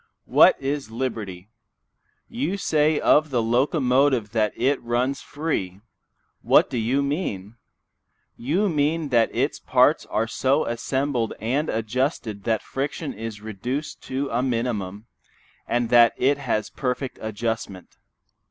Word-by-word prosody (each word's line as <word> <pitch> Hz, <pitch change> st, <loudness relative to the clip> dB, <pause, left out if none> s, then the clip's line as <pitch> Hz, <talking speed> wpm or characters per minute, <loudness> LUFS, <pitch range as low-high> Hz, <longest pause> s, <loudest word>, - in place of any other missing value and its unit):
What -, -, +6 dB
it 140 Hz, -2 st, -3 dB
liberty? 110 Hz, -6 st, -5 dB, 0.8 s
You 180 Hz, +7 st, -2 dB
say 155 Hz, -4 st, +2 dB
of 155 Hz, +1 st, +4 dB
the 125 Hz, -3 st, 0 dB
locomotive 125 Hz, -1 st, +2 dB
that 110 Hz, -2 st, +1 dB
it 135 Hz, +3 st, +1 dB
runs 125 Hz, +3 st, -1 dB
free. 120 Hz, -, -3 dB, 0.6 s
What -, -, +4 dB
do 120 Hz, -, -1 dB
you 130 Hz, +5 st, +1 dB
mean? 120 Hz, -, -3 dB, 0.8 s
You 170 Hz, -, 0 dB
mean 155 Hz, -1 st, 0 dB
that 115 Hz, -3 st, +3 dB
its -, -, -1 dB
parts -, -, +3 dB
are 110 Hz, -, 0 dB
so 135 Hz, +6 st, +1 dB
assembled 125 Hz, 0 st, -1 dB
and 135 Hz, +8 st, -1 dB
adjusted 110 Hz, -2 st, -2 dB
that 110 Hz, -2 st, 0 dB
friction 140 Hz, +2 st, -4 dB
is 110 Hz, -1 st, -7 dB
reduced 120 Hz, +8 st, -5 dB
to 135 Hz, +2 st, -2 dB
a 120 Hz, +2 st, +1 dB
minimum, 115 Hz, -5 st, -2 dB, 0.6 s
and 120 Hz, -1 st, 0 dB
that 120 Hz, -1 st, +6 dB
it 140 Hz, +3 st, +2 dB
has 105 Hz, -2 st, -2 dB
perfect 125 Hz, 0 st, -3 dB
adjustment. 110 Hz, -3 st, -4 dB
125 Hz, 125 wpm, -24 LUFS, 110-140 Hz, 0.8 s, What